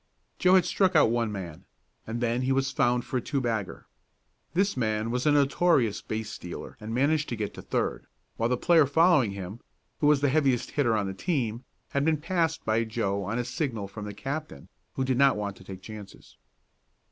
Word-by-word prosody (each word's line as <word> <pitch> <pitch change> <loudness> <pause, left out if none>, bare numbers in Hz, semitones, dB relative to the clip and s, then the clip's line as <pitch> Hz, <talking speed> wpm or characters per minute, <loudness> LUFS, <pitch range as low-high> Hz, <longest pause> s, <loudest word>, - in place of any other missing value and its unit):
Joe 185 +1 +5
had 185 - +5
struck 190 -2 +2
out 150 - +5
one 115 -2 0
man, 90 -6 -7 0.4
and 115 +2 -4
then 120 +1 0
he 130 +1 0
was 135 0 +1
found 125 -3 +1
for 130 - -2
a - - -1
two 140 - -2
bagger. 115 -6 -3 0.7
This 195 +3 +2
man 110 -2 -1
was 125 +3 -1
a - - +5
notorious 140 - +3
base 110 0 -4
stealer 90 -4 -8
and 110 0 -7
managed 145 +5 +1
to 120 - -2
get 105 -2 -4
to - - -9
third, - - -2 0.3
while 115 +1 0
the 125 - +1
player 165 0 +4
following 160 - +4
him, 100 +3 -7 0.4
who 145 - +3
was 150 -2 +4
the 145 - +3
heaviest 135 -4 +1
hitter 120 -7 +2
on 105 - 0
the 95 - -3
team, 125 - -2 0.2
had 140 - 0
been 160 0 +2
passed 165 +1 -1
by 110 +1 +2
Joe 110 -3 -2
on 110 +5 -2
a 120 - -1
signal 120 - -3
from 105 +1 -8
the 105 - -6
captain, 140 - -6 0.3
who 130 - 0
did 130 -1 0
not 140 -4 +5
want 100 -1 -3
to - - -14
take 95 0 -10
chances. 105 -2 -11
120 Hz, 205 wpm, -27 LUFS, 110-145 Hz, 0.7 s, Joe